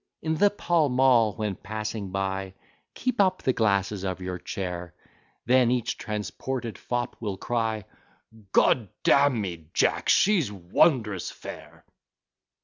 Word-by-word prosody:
In 160 Hz, 0 st, 0 dB
the 205 Hz, +5 st, +5 dB
Pall 170 Hz, -6 st, +1 dB
Mall 125 Hz, -4 st, +4 dB
when 105 Hz, -3 st, -2 dB
passing 110 Hz, +1 st, -5 dB
by, 95 Hz, 0 st, -3 dB, 0.4 s
Keep 255 Hz, -4 st, 0 dB
up 185 Hz, -1 st, +1 dB
the 130 Hz, -, +2 dB
glasses 100 Hz, -3 st, +1 dB
of 95 Hz, -2 st, -3 dB
your 90 Hz, -1 st, -5 dB
chair, 90 Hz, -2 st, -5 dB, 0.5 s
Then 125 Hz, -1 st, +4 dB
each 120 Hz, -1 st, 0 dB
transported 115 Hz, +3 st, -4 dB
fop 120 Hz, 0 st, -3 dB
will 105 Hz, -4 st, -4 dB
cry, 110 Hz, -1 st, -1 dB, 0.7 s
"G -, -, +7 dB
d 115 Hz, -5 st, -10 dB, 0.2 s
d -, -, +5 dB
n 140 Hz, -4 st, +4 dB
me, 85 Hz, -6 st, -5 dB
Jack, -, -, +1 dB
she's 180 Hz, -, +4 dB
wondrous 105 Hz, -, +1 dB
fair!" -, -, -11 dB
110 Hz, 140 wpm, -26 LUFS, 95-130 Hz, 0.7 s, G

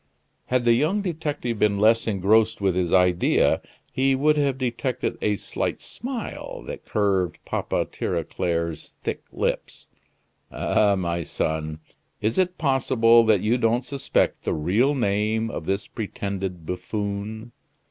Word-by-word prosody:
Had 125 Hz, -1 st, +1 dB
the 120 Hz, -, +6 dB
young 160 Hz, -, +1 dB
detective 150 Hz, -, -3 dB
been 105 Hz, -1 st, +3 dB
less 110 Hz, +3 st, +4 dB
engrossed 110 Hz, +2 st, +3 dB
with 95 Hz, -2 st, +2 dB
his 90 Hz, -1 st, 0 dB
idea, 90 Hz, -1 st, +3 dB, 0.3 s
he 135 Hz, +1 st, +2 dB
would 150 Hz, +3 st, +3 dB
have 140 Hz, -3 st, +1 dB
detected 125 Hz, 0 st, -2 dB
a 105 Hz, -, +2 dB
slight -, -, -3 dB
smile 250 Hz, -3 st, -6 dB
that -, -, -8 dB
curved 95 Hz, -4 st, +1 dB
Papa -, -, -1 dB
Tirauclair's 85 Hz, -3 st, -3 dB
thick -, -, -3 dB
lips. -, -, -3 dB, 0.7 s
"Ah, 100 Hz, -1 st, +2 dB
my 85 Hz, -2 st, -1 dB
son! 80 Hz, -1 st, -3 dB, 0.4 s
is 110 Hz, -, 0 dB
it 180 Hz, -1 st, +1 dB
possible 125 Hz, -5 st, +4 dB
that 110 Hz, -4 st, +4 dB
you 115 Hz, +4 st, +1 dB
don't 120 Hz, +2 st, +1 dB
suspect 140 Hz, -2 st, 0 dB
the -, -, -1 dB
real 105 Hz, -, +2 dB
name 110 Hz, -1 st, 0 dB
of 80 Hz, -, -6 dB
this 95 Hz, +1 st, -1 dB
pretended 95 Hz, -5 st, -4 dB
buffoon?" 100 Hz, +5 st, -4 dB
110 Hz, 135 wpm, -24 LUFS, 95-130 Hz, 0.7 s, the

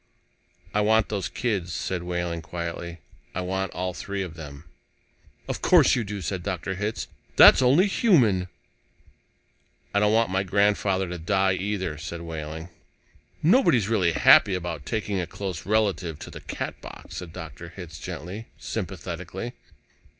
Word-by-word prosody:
"I 105 Hz, -, +2 dB
want 110 Hz, +1 st, +3 dB
those 100 Hz, -3 st, -2 dB
kids," 100 Hz, -8 st, -2 dB
said 90 Hz, -2 st, -2 dB
Wehling 85 Hz, -1 st, -3 dB
quietly. 85 Hz, 0 st, -5 dB, 0.3 s
"I 95 Hz, -, -1 dB
want 95 Hz, 0 st, -2 dB
all 90 Hz, 0 st, -2 dB
three 100 Hz, +2 st, -4 dB
of 90 Hz, -4 st, -7 dB
them." 75 Hz, -3 st, -9 dB, 0.8 s
"Of -, -, -3 dB
course -, -, +6 dB
you 120 Hz, -, 0 dB
do," 100 Hz, -1 st, -5 dB
said 95 Hz, +1 st, -2 dB
Dr. 95 Hz, 0 st, -3 dB
Hitz. 105 Hz, +3 st, -3 dB, 0.3 s
"That's -, -, +9 dB
only 135 Hz, +9 st, +5 dB
human." 130 Hz, -, +3 dB, 1.5 s
"I 100 Hz, -, +3 dB
don't 105 Hz, 0 st, +3 dB
want 115 Hz, -2 st, +3 dB
my 95 Hz, 0 st, +2 dB
grandfather 100 Hz, -1 st, +2 dB
to 90 Hz, 0 st, -5 dB
die, 95 Hz, +3 st, +2 dB
either," 95 Hz, -4 st, -2 dB
said 85 Hz, +1 st, -6 dB
Wehling. 80 Hz, 0 st, -6 dB, 0.7 s
"Nobody's 155 Hz, -, +4 dB
really 90 Hz, -7 st, +2 dB
happy 95 Hz, +4 st, +6 dB
about 85 Hz, -5 st, -5 dB
taking 105 Hz, -3 st, -1 dB
a 85 Hz, -, -4 dB
close 95 Hz, -1 st, -5 dB
relative 100 Hz, -7 st, +1 dB
to -, -, -9 dB
the -, -, -9 dB
Catbox," -, -, -7 dB
said 90 Hz, -2 st, -6 dB
Dr. 80 Hz, +1 st, -8 dB
Hitz 85 Hz, -4 st, -9 dB
gently, 90 Hz, +12 st, -7 dB
sympathetically. 95 Hz, +2 st, -5 dB
95 Hz, 145 wpm, -26 LUFS, 85-105 Hz, 1.5 s, That's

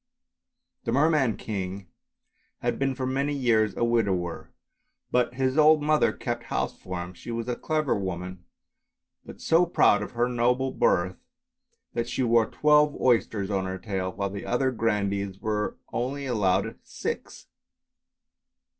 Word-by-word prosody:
The -, -, 0 dB
Merman 140 Hz, -3 st, +3 dB
King 95 Hz, -2 st, -5 dB, 0.8 s
had -, -, -1 dB
been 135 Hz, -1 st, 0 dB
for 130 Hz, 0 st, -3 dB
many 140 Hz, +3 st, 0 dB
years 115 Hz, -5 st, +2 dB
a -, -, 0 dB
widower, 100 Hz, -8 st, 0 dB, 0.6 s
but 125 Hz, -1 st, +1 dB
his 130 Hz, +2 st, +1 dB
old 155 Hz, 0 st, +6 dB
mother 155 Hz, 0 st, +3 dB
kept 120 Hz, -1 st, -4 dB
house -, -, -2 dB
for 90 Hz, -1 st, -5 dB
him; 90 Hz, +1 st, -9 dB
she 90 Hz, -, -11 dB
was 115 Hz, 0 st, -3 dB
a 125 Hz, -, -1 dB
clever 155 Hz, 0 st, 0 dB
woman, 90 Hz, -1 st, -5 dB, 0.8 s
but -, -, -11 dB
so 165 Hz, +2 st, +4 dB
proud 105 Hz, -11 st, +4 dB
of 105 Hz, -, -6 dB
her 120 Hz, +1 st, +1 dB
noble 125 Hz, +2 st, +1 dB
birth 90 Hz, -6 st, +1 dB, 0.8 s
that 120 Hz, 0 st, -2 dB
she 130 Hz, -, -1 dB
wore 115 Hz, -2 st, +4 dB
twelve 150 Hz, -1 st, +3 dB
oysters 105 Hz, -4 st, +1 dB
on 95 Hz, -1 st, 0 dB
her 95 Hz, 0 st, -4 dB
tail, 95 Hz, -1 st, -3 dB
while 100 Hz, 0 st, -3 dB
the 100 Hz, 0 st, -6 dB
other 130 Hz, +2 st, +1 dB
grandees 100 Hz, -4 st, -1 dB
were 105 Hz, 0 st, -2 dB, 0.2 s
only 135 Hz, +4 st, -2 dB
allowed 105 Hz, -8 st, 0 dB
six. -, -, -6 dB
115 Hz, 145 wpm, -26 LUFS, 100-130 Hz, 0.8 s, old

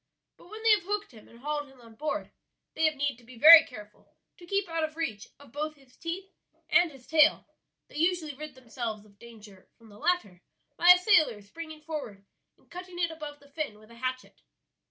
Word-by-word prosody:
But -, -, -19 dB
when 435 Hz, +2 st, -9 dB
they 455 Hz, -, +5 dB
have 420 Hz, -, +5 dB
hooked 410 Hz, +1 st, -3 dB
him 220 Hz, -3 st, -16 dB
and 230 Hz, -, -17 dB
hauled 295 Hz, 0 st, -3 dB
him 270 Hz, -1 st, -20 dB
on 230 Hz, -2 st, -16 dB
board 300 Hz, +7 st, -4 dB, 0.4 s
they 320 Hz, -, +1 dB
have 310 Hz, -1 st, +2 dB
need 285 Hz, -3 st, -1 dB
to 240 Hz, -, -20 dB
be 240 Hz, +1 st, -14 dB
very 320 Hz, +5 st, +11 dB
careful 210 Hz, -4 st, -14 dB, 0.2 s
to 345 Hz, -, -15 dB
keep 395 Hz, +1 st, 0 dB
out 330 Hz, -1 st, -2 dB
of 310 Hz, 0 st, -3 dB
reach 220 Hz, -11 st, -4 dB
of 285 Hz, -5 st, -17 dB
both 305 Hz, +3 st, -4 dB
his 270 Hz, -3 st, -24 dB
teeth 370 Hz, +3 st, -6 dB, 0.4 s
and 350 Hz, -2 st, +4 dB
his 265 Hz, -3 st, -16 dB
tail; 315 Hz, -1 st, +4 dB, 0.4 s
they -, -, -12 dB
usually 330 Hz, -2 st, 0 dB
rid 300 Hz, 0 st, -9 dB
themselves 230 Hz, -4 st, -6 dB
of 200 Hz, -1 st, -23 dB
danger 215 Hz, -5 st, -15 dB
from 230 Hz, -2 st, -19 dB
the 205 Hz, 0 st, -15 dB
latter 215 Hz, -, -1 dB, 0.3 s
by 345 Hz, -, 0 dB
a 360 Hz, -, +11 dB
sailor 355 Hz, -, +3 dB
springing 315 Hz, +8 st, -10 dB
forward 290 Hz, -11 st, -7 dB, 0.3 s
and -, -, -31 dB
cutting 360 Hz, 0 st, -9 dB
it 340 Hz, -1 st, 0 dB
above 300 Hz, -2 st, -8 dB
the 285 Hz, 0 st, -21 dB
fin 285 Hz, -8 st, -4 dB
with 215 Hz, +2 st, -19 dB
a -, -, -14 dB
hatchet. 255 Hz, +1 st, -5 dB
295 Hz, 215 wpm, -28 LUFS, 235-330 Hz, 0.4 s, very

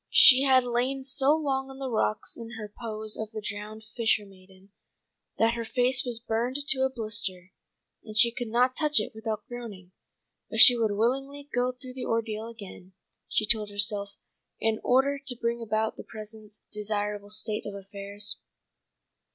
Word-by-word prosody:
She 260 Hz, -1 st, +8 dB
had 260 Hz, -2 st, +5 dB
lain 250 Hz, +3 st, -1 dB
so 275 Hz, +2 st, +3 dB
long 270 Hz, -4 st, -1 dB
on 270 Hz, -, -10 dB
the 270 Hz, -1 st, -4 dB
rocks 215 Hz, -3 st, -1 dB
in 230 Hz, -1 st, -8 dB
her 210 Hz, -2 st, -8 dB
pose 215 Hz, -2 st, -2 dB
of 220 Hz, -1 st, -4 dB
the 220 Hz, 0 st, -6 dB
drowned 210 Hz, +1 st, -7 dB
fishermaiden, 195 Hz, -4 st, -3 dB, 0.7 s
that 225 Hz, +1 st, +3 dB
her 235 Hz, -1 st, -3 dB
face 250 Hz, +3 st, +1 dB
was 245 Hz, -4 st, -2 dB
burned 235 Hz, +2 st, -2 dB
to 265 Hz, -, +3 dB
a 265 Hz, -, +3 dB
blister, 210 Hz, -6 st, -3 dB, 0.5 s
and 215 Hz, -1 st, -7 dB
she 235 Hz, +1 st, +6 dB
could 240 Hz, 0 st, -5 dB
not 250 Hz, +3 st, +2 dB
touch 300 Hz, -5 st, +2 dB
it 210 Hz, -, -4 dB
without 220 Hz, -1 st, -4 dB
groaning. 215 Hz, -7 st, -9 dB, 0.6 s
But -, -, -3 dB
she 250 Hz, -, +10 dB
would 225 Hz, -3 st, 0 dB
willingly 270 Hz, +5 st, -1 dB
go 245 Hz, +1 st, +1 dB
through 255 Hz, 0 st, -11 dB
the 255 Hz, -, -6 dB
ordeal 225 Hz, -1 st, -2 dB
again, 200 Hz, -5 st, -11 dB, 0.4 s
she 215 Hz, -, +1 dB
told 215 Hz, -1 st, +4 dB
herself, 205 Hz, -1 st, +1 dB, 0.4 s
in 220 Hz, -1 st, 0 dB
order 275 Hz, +3 st, +2 dB
to 270 Hz, -3 st, 0 dB
bring 235 Hz, 0 st, -1 dB
about 220 Hz, 0 st, -1 dB
the -, -, -8 dB
present 215 Hz, -1 st, -10 dB
desirable 210 Hz, -1 st, -2 dB
state 215 Hz, 0 st, -2 dB
of 205 Hz, -, -6 dB
affairs. 200 Hz, +1 st, -1 dB
225 Hz, 170 wpm, -27 LUFS, 210-250 Hz, 0.7 s, she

